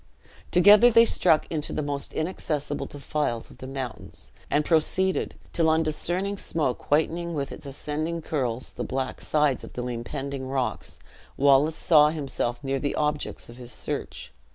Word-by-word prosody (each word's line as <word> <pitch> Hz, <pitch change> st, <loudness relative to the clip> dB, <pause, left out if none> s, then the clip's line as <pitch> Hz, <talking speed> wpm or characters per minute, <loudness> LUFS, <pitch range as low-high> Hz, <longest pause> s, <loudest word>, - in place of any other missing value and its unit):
Together 205 Hz, +7 st, +7 dB
they 230 Hz, 0 st, +7 dB
struck 160 Hz, -8 st, +3 dB
into 155 Hz, -2 st, -2 dB
the 155 Hz, -, -2 dB
most 145 Hz, -1 st, -3 dB
inaccessible 155 Hz, -3 st, -3 dB
defiles 145 Hz, -5 st, -3 dB
of -, -, -16 dB
the 130 Hz, -, -7 dB
mountains, 135 Hz, -2 st, -7 dB, 0.2 s
and 150 Hz, +1 st, +2 dB
proceeded, 185 Hz, +3 st, +1 dB, 0.2 s
till 165 Hz, -1 st, +3 dB
on 160 Hz, +1 st, +3 dB
discerning 180 Hz, +5 st, -2 dB
smoke 150 Hz, -6 st, -2 dB
whitening 165 Hz, +3 st, +1 dB
with 140 Hz, -2 st, -3 dB
its -, -, -9 dB
ascending 150 Hz, +4 st, -3 dB
curls 130 Hz, -6 st, -3 dB
the -, -, -4 dB
black 130 Hz, 0 st, -3 dB
sides 150 Hz, -3 st, +1 dB
of -, -, -10 dB
the 125 Hz, -, -4 dB
impending 130 Hz, +3 st, -4 dB
rocks, 130 Hz, -1 st, -2 dB, 0.4 s
Wallace 140 Hz, +3 st, +4 dB
saw 150 Hz, -3 st, +5 dB
himself 140 Hz, -4 st, -3 dB
near 135 Hz, 0 st, -1 dB
the 145 Hz, +1 st, -2 dB
objects 150 Hz, 0 st, -2 dB
of 120 Hz, -, -12 dB
his 125 Hz, -1 st, -9 dB
search. -, -, -5 dB
150 Hz, 155 wpm, -26 LUFS, 135-160 Hz, 0.4 s, Together